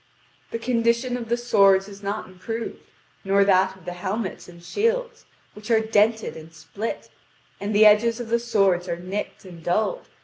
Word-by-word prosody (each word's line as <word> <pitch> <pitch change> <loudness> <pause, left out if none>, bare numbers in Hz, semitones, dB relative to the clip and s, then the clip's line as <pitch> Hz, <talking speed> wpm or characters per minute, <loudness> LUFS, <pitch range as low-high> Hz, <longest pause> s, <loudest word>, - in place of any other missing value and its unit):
The - - -3
condition 235 +1 0
of 235 -2 -6
the 235 - +1
swords 200 -5 +4
is 200 -1 -12
not 205 +1 -3
improved, 205 +5 -6 0.4
nor 195 +1 +3
that 190 -1 +3
of 185 - -19
the 180 - -4
helmets 190 +2 -4
and 170 -1 -14
shields, 465 - -1 0.3
which 210 +2 -11
are 225 -1 +5
dented 220 0 +1
and 160 0 -11
split; 165 +8 -6 0.5
and 200 +1 -3
the 215 +1 +7
edges 225 +3 +5
of 240 -2 -6
the 235 +1 +2
swords 195 -6 +1
are 170 - -2
nicked 190 +3 -6
and 170 -3 -12
dulled. 220 - -1
210 Hz, 175 wpm, -24 LUFS, 185-230 Hz, 0.5 s, the